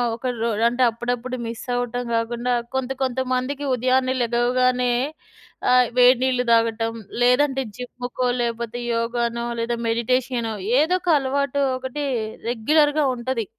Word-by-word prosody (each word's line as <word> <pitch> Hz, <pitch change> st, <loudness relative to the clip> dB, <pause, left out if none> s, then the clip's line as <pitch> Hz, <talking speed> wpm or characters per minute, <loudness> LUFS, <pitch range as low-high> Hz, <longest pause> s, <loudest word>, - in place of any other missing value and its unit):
ఒక 245 Hz, +3 st, -5 dB
రో 230 Hz, -, +1 dB, 0.2 s
అంటే 245 Hz, +2 st, 0 dB
అప్పుడప్పుడు 245 Hz, +2 st, -3 dB
మిస్ 230 Hz, 0 st, -6 dB
అవ్వటం 245 Hz, 0 st, -2 dB
కాకుండా, 240 Hz, +2 st, -1 dB, 0.2 s
కొంత, 265 Hz, -1 st, -1 dB
కొంత 260 Hz, 0 st, -1 dB
మందికి 270 Hz, +3 st, -2 dB
ఉదయాన్నే 255 Hz, +1 st, +1 dB
లెగవగానే 245 Hz, +1 st, +2 dB, 0.8 s
ఆహ్, 250 Hz, -1 st, +5 dB
వేడి 250 Hz, 0 st, +6 dB
నీళ్లు 255 Hz, -1 st, +1 dB
తాగటం, 230 Hz, 0 st, +2 dB, 0.3 s
లేదంటే 270 Hz, +2 st, +3 dB
జిమ్ము, 245 Hz, 0 st, -6 dB
కో 255 Hz, -, +1 dB, 0.2 s
లేకపోతే 235 Hz, 0 st, -3 dB, 0.2 s
యోగానో, 235 Hz, 0 st, -1 dB
లేదా 235 Hz, +1 st, -1 dB
మెడిటేషనో 235 Hz, 0 st, 0 dB, 0.3 s
ఏదోక 360 Hz, +3 st, +1 dB
అలవాటు 280 Hz, +1 st, -1 dB, 0.2 s
ఒకటి 260 Hz, +3 st, -5 dB, 0.5 s
రెగ్యులర్‌గా 295 Hz, +6 st, +2 dB
ఉంటది. 235 Hz, -2 st, -2 dB
245 Hz, 125 wpm, -22 LUFS, 235-260 Hz, 0.8 s, వేడి